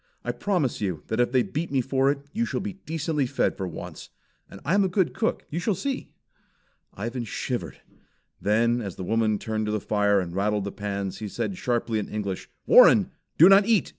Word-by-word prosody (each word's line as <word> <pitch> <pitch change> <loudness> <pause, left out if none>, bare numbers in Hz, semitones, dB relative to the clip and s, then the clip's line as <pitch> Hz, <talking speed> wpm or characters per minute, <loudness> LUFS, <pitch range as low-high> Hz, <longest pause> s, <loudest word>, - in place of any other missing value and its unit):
I - - -1
promise 175 - -1
you 90 -7 -2
that 110 - -1
if 120 0 +2
they 130 -1 +3
beat 160 +2 -4
me 135 - +2
for 135 +2 +1
it 140 0 -2
you 230 - 0
shall - - -2
be 200 +1 -4
decently 155 -3 -1
fed - - 0
for 95 - -4
once. 85 - -8 0.4
And - - -11
I 165 - +1
am 200 0 +4
a - - +2
good 185 -1 +1
cook; 225 - -1
you 165 - -2
shall 200 +3 0
see!" 275 +4 -3 0.9
Ivan 120 +4 -4
shivered. 110 - -4 0.6
Then 115 +5 +2
as 100 -5 -5
the 95 - -6
woman 110 +2 +1
turned 110 0 -3
to - - -1
the 105 - 0
fire 105 0 +2
and 90 -2 -4
rattled 105 +1 0
the 100 - -4
pans, 100 -2 -4
he 110 - -4
said 185 - -3
sharply 120 -7 -1
in 105 - -5
English: 100 -3 -4 0.2
"Warren, - - +7 0.3
do 165 - +9
not 195 +2 +6
eat!" 225 -4 +3
120 Hz, 210 wpm, -25 LUFS, 105-165 Hz, 0.9 s, do